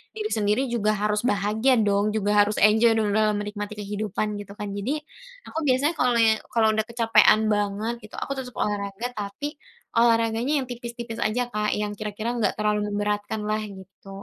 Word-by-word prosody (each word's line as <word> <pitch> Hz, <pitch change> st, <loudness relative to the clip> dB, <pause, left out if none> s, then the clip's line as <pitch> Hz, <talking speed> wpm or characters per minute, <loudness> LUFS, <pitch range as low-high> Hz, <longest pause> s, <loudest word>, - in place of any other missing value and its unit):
diri 430 Hz, 0 st, -3 dB
sendiri 210 Hz, +2 st, +1 dB
juga 215 Hz, -2 st, +2 dB
harus 210 Hz, +1 st, 0 dB
bahagia 220 Hz, +2 st, +2 dB
dong, 205 Hz, -1 st, +2 dB
juga 205 Hz, -1 st, 0 dB
harus 205 Hz, +1 st, +1 dB
enjoy 220 Hz, +2 st, +5 dB
dong 210 Hz, -2 st, +1 dB
dalam 215 Hz, -1 st, +2 dB
menikmati 205 Hz, 0 st, -5 dB
kehidupan, 210 Hz, 0 st, -3 dB
gitu 200 Hz, 0 st, -11 dB
kan. 205 Hz, -1 st, -5 dB
Jadi, 250 Hz, +10 st, -1 dB, 0.5 s
aku -, -, -8 dB
biasanya 270 Hz, +5 st, +2 dB
kalau 245 Hz, -1 st, +3 dB
ye 225 Hz, -1 st, +5 dB, 0.2 s
kalau 225 Hz, -2 st, +4 dB
udah 215 Hz, 0 st, 0 dB
kecapean 225 Hz, -2 st, +4 dB
banget 205 Hz, +2 st, -1 dB
gitu, 215 Hz, -, -12 dB
aku 275 Hz, -, -2 dB
tetep 250 Hz, -3 st, -8 dB
olahraga, 205 Hz, +2 st, -2 dB
tapi 205 Hz, +7 st, -4 dB, 0.5 s
olahraganya 230 Hz, +4 st, +3 dB
yang 260 Hz, -, -6 dB
tipis-tipis 235 Hz, -1 st, -6 dB
aja 240 Hz, +2 st, -1 dB
Kak, 210 Hz, -1 st, 0 dB
yang 210 Hz, 0 st, -2 dB
kira-kira 215 Hz, +2 st, -4 dB
nggak 210 Hz, -4 st, +1 dB
terlalu 210 Hz, 0 st, +1 dB
memberatkanlah, 210 Hz, +1 st, -1 dB, 0.2 s
gitu. 190 Hz, +1 st, -15 dB
215 Hz, 170 wpm, -25 LUFS, 205-235 Hz, 0.5 s, enjoy